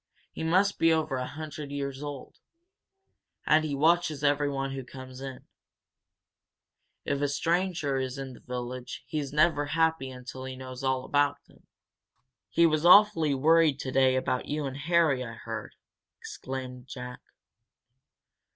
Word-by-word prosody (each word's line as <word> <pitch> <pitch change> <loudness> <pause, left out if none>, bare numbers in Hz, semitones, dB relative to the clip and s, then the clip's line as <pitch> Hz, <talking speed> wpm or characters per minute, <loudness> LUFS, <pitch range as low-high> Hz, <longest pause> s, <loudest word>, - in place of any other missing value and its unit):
He - - -6
must 185 +5 +2
be 165 - +5
over 155 -4 +1
a 125 0 -3
hundred 150 -1 -7
years 140 -1 -4
old. 145 -2 -8 1.1
And 155 +1 +4
he 150 -2 -2
watches 160 0 +2
everyone 145 -2 +1
who 135 -1 -5
comes 130 0 -10
in. 135 -2 -7 1.6
If 140 0 -1
a 145 - +2
stranger 165 -1 0
is 130 0 -3
in 135 -1 -6
the - - -13
village 125 0 -6
he's 150 -3 -3
never 150 -1 +3
happy 160 -4 +2
until 130 0 -8
he 130 0 -6
knows 130 0 -8
all 130 -1 0
about 145 0 +2
him. - - -23 0.8
He 170 - +4
was 155 -1 +2
awfully 175 -5 +6
worried 155 0 +4
today 130 -1 +2
about 130 -1 -1
you 150 0 -2
and 135 -1 -4
Harry, 155 -3 +2
I 115 -2 -7
heard," 115 -2 -7 0.4
explained 130 -1 -7
Jack. 125 -1 -7
140 Hz, 140 wpm, -28 LUFS, 130-155 Hz, 1.6 s, awfully